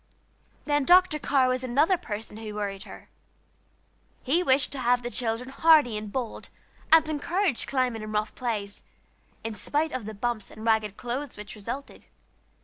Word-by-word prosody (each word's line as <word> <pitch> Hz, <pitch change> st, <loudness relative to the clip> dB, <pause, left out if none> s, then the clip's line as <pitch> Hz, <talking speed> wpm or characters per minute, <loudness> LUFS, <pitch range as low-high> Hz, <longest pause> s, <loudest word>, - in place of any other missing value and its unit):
Then 290 Hz, -1 st, +2 dB
Dr. 355 Hz, 0 st, +5 dB
Carr 275 Hz, -3 st, +2 dB
was 255 Hz, 0 st, 0 dB
another 285 Hz, +9 st, +3 dB
person 215 Hz, -, -6 dB
who 215 Hz, -1 st, -7 dB
worried 200 Hz, -2 st, -4 dB
her. -, -, -12 dB, 1.1 s
He 305 Hz, +7 st, +2 dB
wished 270 Hz, -5 st, +3 dB
to 280 Hz, -, -5 dB
have 245 Hz, 0 st, +2 dB
the 240 Hz, -, -4 dB
children 240 Hz, +1 st, -2 dB
hardy 290 Hz, -4 st, +5 dB
and 210 Hz, -1 st, -5 dB
bold, 245 Hz, -2 st, -4 dB, 0.4 s
and 320 Hz, -1 st, +7 dB
encouraged 320 Hz, -, 0 dB
climbing 255 Hz, -4 st, 0 dB
and 215 Hz, 0 st, -6 dB
rough 215 Hz, 0 st, -1 dB
plays, 210 Hz, -5 st, -3 dB, 0.6 s
in 225 Hz, -, -4 dB
spite 295 Hz, +8 st, -1 dB
of 255 Hz, -4 st, -4 dB
the 215 Hz, 0 st, -6 dB
bumps 220 Hz, -1 st, -2 dB
and 220 Hz, -, -10 dB
ragged 220 Hz, -3 st, +1 dB
clothes 250 Hz, +2 st, -4 dB
which 210 Hz, 0 st, -8 dB
resulted. 235 Hz, +7 st, -7 dB
245 Hz, 160 wpm, -27 LUFS, 215-285 Hz, 1.1 s, and